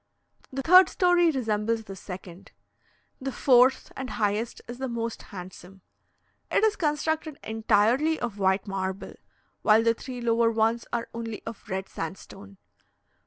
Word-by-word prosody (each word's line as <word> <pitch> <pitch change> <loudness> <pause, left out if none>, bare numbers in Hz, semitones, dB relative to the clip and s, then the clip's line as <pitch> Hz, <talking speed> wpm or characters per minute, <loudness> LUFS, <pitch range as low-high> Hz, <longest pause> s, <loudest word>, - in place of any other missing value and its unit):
The 270 0 -4
third 365 +4 +8
story 355 -2 +3
resembles 225 -4 -1
the 195 -2 -9
second. 180 -1 -10 0.7
The 270 +1 -3
fourth 255 0 +4
and 260 -1 -5
highest 215 +1 -1
is 240 +1 -8
the 265 - -2
most 230 -1 -4
handsome. 185 0 -11 0.7
It - - +2
is 435 -1 +3
constructed 310 -2 -1
entirely 225 +8 +2
of 225 -4 -4
white 190 0 +2
marble, 190 0 -4 0.5
while 220 +1 +5
the 230 0 +4
three 250 +2 -8
lower 230 -1 +2
ones 225 +1 0
are 235 -1 -2
only 230 -2 -6
of 225 -1 -9
red 190 0 -3
sandstone. 100 - -8
230 Hz, 140 wpm, -26 LUFS, 200-265 Hz, 0.7 s, third